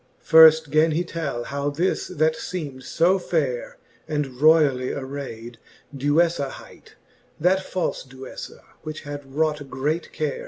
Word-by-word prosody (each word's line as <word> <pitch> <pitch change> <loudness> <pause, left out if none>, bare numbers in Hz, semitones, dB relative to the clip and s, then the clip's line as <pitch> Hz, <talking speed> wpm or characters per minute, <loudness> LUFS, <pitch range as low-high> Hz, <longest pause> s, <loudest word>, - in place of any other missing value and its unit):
XL. - - -3
Firft 160 -1 +8
gan 155 +2 +4
he 170 +3 0
tell, 155 -8 -4
how 140 +2 -3
this, 165 +6 -1
that 160 -2 +1
feem'd 145 -8 -6
fo 180 +8 +2
faire 145 -9 -2 0.3
And 145 -4 -3
royally 150 -5 +4
arayd, 130 -4 -7 0.4
Duejfa 145 +1 +1
hight, - - -14 0.4
That 180 +4 +3
falic 185 -7 -3
Duejfay 130 0 -10 0.2
which 155 0 -7
had 145 -2 -8
wrought 150 -2 0
great 150 +6 -2
care. 150 -2 -3
150 Hz, 135 wpm, -23 LUFS, 135-160 Hz, 0.4 s, Firft